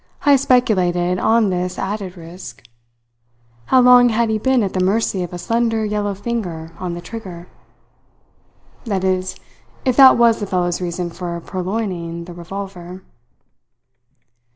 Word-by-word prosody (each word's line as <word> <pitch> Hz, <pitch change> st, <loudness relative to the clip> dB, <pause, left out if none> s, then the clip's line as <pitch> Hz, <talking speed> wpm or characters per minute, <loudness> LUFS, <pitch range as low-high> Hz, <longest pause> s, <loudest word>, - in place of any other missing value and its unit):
Heyst 280 Hz, -3 st, +5 dB
speculated 180 Hz, -7 st, +2 dB
on 220 Hz, -3 st, +3 dB
this 180 Hz, 0 st, -2 dB
added 195 Hz, -2 st, -4 dB
risk. 165 Hz, -7 st, -11 dB, 1.0 s
How 260 Hz, -, +4 dB
long 245 Hz, 0 st, +7 dB
had 230 Hz, 0 st, +1 dB
he 215 Hz, -, 0 dB
been 260 Hz, 0 st, +2 dB
at 195 Hz, -, -3 dB
the 185 Hz, -, -1 dB
mercy 195 Hz, 0 st, 0 dB
of 175 Hz, -, -5 dB
a 180 Hz, -, -6 dB
slender 225 Hz, +4 st, 0 dB
yellow 205 Hz, -1 st, -2 dB
finger 185 Hz, -7 st, -4 dB
on 180 Hz, -2 st, -4 dB
the 175 Hz, -, -7 dB
trigger? 180 Hz, -3 st, -9 dB, 1.4 s
That 195 Hz, -5 st, -2 dB
is, 185 Hz, 0 st, -1 dB, 0.5 s
if 255 Hz, -2 st, +2 dB
that 265 Hz, -2 st, +8 dB
was 235 Hz, -1 st, +4 dB
the 205 Hz, -, -4 dB
fellow's 180 Hz, -1 st, -1 dB
reason 175 Hz, 0 st, -3 dB
for 170 Hz, -1 st, -5 dB
purloining 180 Hz, -2 st, -4 dB
the 175 Hz, -, -10 dB
revolver. 180 Hz, +1 st, -8 dB
190 Hz, 140 wpm, -19 LUFS, 175-225 Hz, 1.4 s, that